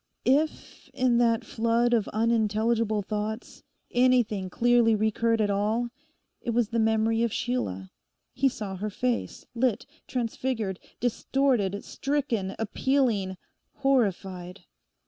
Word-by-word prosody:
If, 295 +4 0
in 250 -3 +3
that 230 -2 +2
flood 230 +2 +1
of 225 -4 +2
unintelligible 220 -1 +1
thoughts, 215 +3 -4 0.3
anything 240 -6 +2
clearly 240 +1 +4
recurred 220 +2 +1
at 205 -1 +1
all, 215 +4 0 0.5
it - - -5
was 235 -3 +2
the 230 - 0
memory 220 0 +2
of 235 -1 +1
Sheila. 95 - -2 0.4
He 270 +1 +2
saw 200 -6 -6
her 210 +3 -3
face, 245 +4 -2
lit, 245 -2 0 0.2
transfigured, 230 -5 -2 0.2
distorted, 245 -4 0
stricken, 255 -9 -2
appealing, 225 -4 0 0.4
horrified. 195 -8 0
225 Hz, 110 wpm, -27 LUFS, 210-245 Hz, 0.5 s, clearly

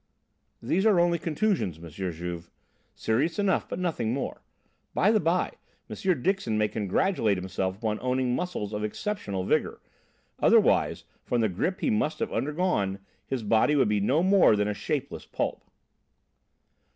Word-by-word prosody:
"These 190 +3 +1
are 200 -5 +5
only 170 -1 +3
contusions, 165 - 0
M. 85 +1 -10
Juve. 85 0 -5 0.5
Serious 145 +10 0
enough, 200 -2 +1
but - - -4
nothing 155 -11 -1
more. 140 - -4 0.5
By 205 - +4
the 220 - +3
by, 175 +1 +1 0.4
M. 180 -9 0
Dixon 185 - 0
may 105 0 +2
congratulate 105 - +1
himself 95 +1 -3
upon 110 -1 -2
owning 125 0 0
muscles 175 - -3
of 105 0 -3
exceptional 105 - -3
vigour. - - 0 0.6
Otherwise, - - +3 0.2
from 120 - 0
the 110 - +2
grip 175 - -2
he 265 - +1
must 215 -8 0
have - - -3
undergone, 135 - 0 0.3
his 130 -4 -3
body 110 +8 +3
would 135 -7 +3
be 105 -1 +2
no 135 - +2
more 190 - +5
than 105 0 +1
a 105 - 0
shapeless 135 +7 -4
pulp." - - -3
125 Hz, 150 wpm, -27 LUFS, -, 0.6 s, are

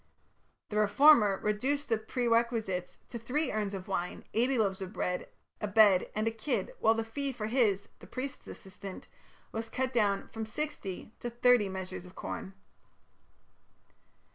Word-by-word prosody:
The 210 - -2
reformer 215 -1 +6
reduced 265 +8 0
the 225 -3 +1
perquisites 230 -5 0
to 235 - -5
"three 275 +7 -1
urns 205 -2 -1
of 185 -1 -7
wine, 180 -2 -3
eighty 250 +4 +2
loaves 200 -3 +1
of 190 -1 -5
bread, 180 0 -2 0.3
a 210 - 0
bed, 205 -3 +5
and 215 +1 0
a - - +2
kid, 225 -2 -2
while 225 +1 +4
the 225 - -1
fee 275 +5 -3
of 260 - -7
his 210 -6 +2
(the - - -13
priest's) 270 +2 -6
assistant 195 0 -9 0.5
was 225 0 -4
cut 260 +1 -2
down 205 -4 +2
from 220 -1 -5
sixty 220 -6 -5
to 240 - -3
thirty 240 -3 +4
measures 185 -1 -6
of 180 - -15
corn". 190 - -6
220 Hz, 155 wpm, -31 LUFS, 195-245 Hz, 0.5 s, reformer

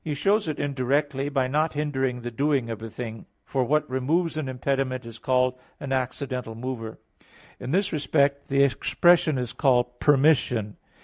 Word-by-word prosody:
He 150 -2 -3
shows 200 +4 +1
it 155 - -3
indirectly, 140 0 -1
by 135 -3 +1
not 155 +4 0
hindering 135 -4 -1
the 120 0 -5
doing 135 -1 0
of 110 -1 -6
a 115 - -6
thing; 115 -1 -7 0.2
for 130 +3 0
what 150 +5 +1
removes 150 +7 0
an 155 -4 -3
impediment 130 -1 -2
is 115 -1 -10
called 125 +1 +1 0.2
an 135 - -6
accidental 130 -2 -3
mover. 115 -2 -5 0.6
In - - -6
this 185 +6 +1
respect 140 -2 +1
the 140 0 +3
expression 165 +3 +3
is 125 -2 -3
called 125 -3 +1
permission. 135 -7 +3
135 Hz, 165 wpm, -25 LUFS, 125-145 Hz, 0.6 s, the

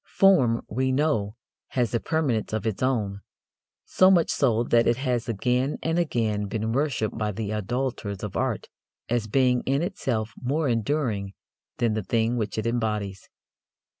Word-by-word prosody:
Form, 135 -13 +4
we 130 +3 0
know, 130 -7 +1 0.3
has 120 -3 -1
a 115 - +2
permanence 135 -11 -1
of 110 -1 -2
its 110 -3 -2
own: 105 -7 0 0.6
so 185 - +5
much 175 -4 +4
so 120 -4 +2
that 120 -1 +3
it 120 - +3
has 125 -3 -1
again 125 +6 0
and 165 +1 +1
again 110 -10 0
been 110 +2 -2
worshipped 130 -5 0
by 105 -2 -1
the 105 +1 -4
idolators 105 -2 -3
of 105 - -5
art - - -1 0.4
as 115 -2 0
being 125 +1 +3
in 140 +4 +2
itself 120 - -2
more 145 +5 0
enduring 115 -4 -1 0.4
than 120 -3 +1
the 110 - -1
thing 115 +4 0
which 110 -3 -2
it 110 - -2
embodies. 105 -5 -2
115 Hz, 160 wpm, -26 LUFS, 110-130 Hz, 0.6 s, so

